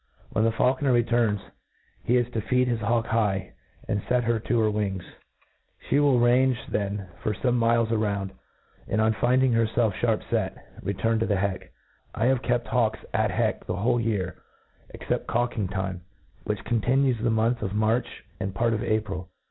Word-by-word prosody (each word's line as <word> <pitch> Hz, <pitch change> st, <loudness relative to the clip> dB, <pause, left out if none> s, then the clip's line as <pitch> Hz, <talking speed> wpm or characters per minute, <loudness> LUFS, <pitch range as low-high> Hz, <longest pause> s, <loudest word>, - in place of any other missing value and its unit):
When 110 Hz, -, +1 dB
the 115 Hz, -, +3 dB
faulconer 130 Hz, +4 st, +2 dB
returns, 120 Hz, -3 st, +2 dB, 0.6 s
he 125 Hz, -, +3 dB
is 120 Hz, -1 st, +1 dB
to 110 Hz, -, -1 dB
feed 125 Hz, +4 st, +1 dB
his 120 Hz, -2 st, 0 dB
hawk 115 Hz, +1 st, +1 dB
high, 105 Hz, -5 st, 0 dB, 0.3 s
and 100 Hz, -, 0 dB
fet 125 Hz, -1 st, +1 dB
her 115 Hz, -1 st, +1 dB
to 115 Hz, +2 st, 0 dB
her 110 Hz, -1 st, +2 dB
wings. 100 Hz, -4 st, -2 dB, 0.8 s
She 140 Hz, -, +1 dB
will 140 Hz, -4 st, +4 dB
range 125 Hz, +1 st, +4 dB
then 100 Hz, -1 st, -2 dB
for 105 Hz, -, -1 dB
fome 125 Hz, +3 st, 0 dB
miles 115 Hz, -1 st, +2 dB
around, 100 Hz, -3 st, -1 dB, 0.6 s
and, 110 Hz, -, 0 dB
on 110 Hz, 0 st, +3 dB
find 125 Hz, +5 st, +2 dB
ing 130 Hz, -2 st, +3 dB
herfelf 115 Hz, 0 st, +2 dB
fliarp 110 Hz, +2 st, 0 dB
fet, -, -, -1 dB, 0.2 s
return 110 Hz, +4 st, 0 dB
to 115 Hz, -, 0 dB
the 100 Hz, -, +1 dB
heck. 95 Hz, -1 st, -2 dB, 0.4 s
I 115 Hz, -, 0 dB
have 130 Hz, -1 st, +3 dB
kept 120 Hz, -2 st, 0 dB
hawks 120 Hz, -3 st, +1 dB
at -, -, +2 dB
heck -, -, -1 dB
the 90 Hz, -, -1 dB
whole 120 Hz, +5 st, +1 dB
year, 100 Hz, -6 st, -2 dB, 0.5 s
except -, -, -3 dB
cawk 120 Hz, +1 st, 0 dB
jng 100 Hz, -5 st, -2 dB
time, 95 Hz, -2 st, -3 dB, 0.4 s
which -, -, -2 dB
contihues 125 Hz, +2 st, +1 dB
the 120 Hz, -, +1 dB
month 115 Hz, +2 st, +1 dB
of 100 Hz, -1 st, -3 dB
March 110 Hz, +3 st, 0 dB
* -, -, -32 dB
and 95 Hz, 0 st, -3 dB
part 115 Hz, +2 st, +1 dB
of 110 Hz, -, -1 dB
April. 100 Hz, -4 st, -2 dB
115 Hz, 185 wpm, -26 LUFS, 105-120 Hz, 0.8 s, will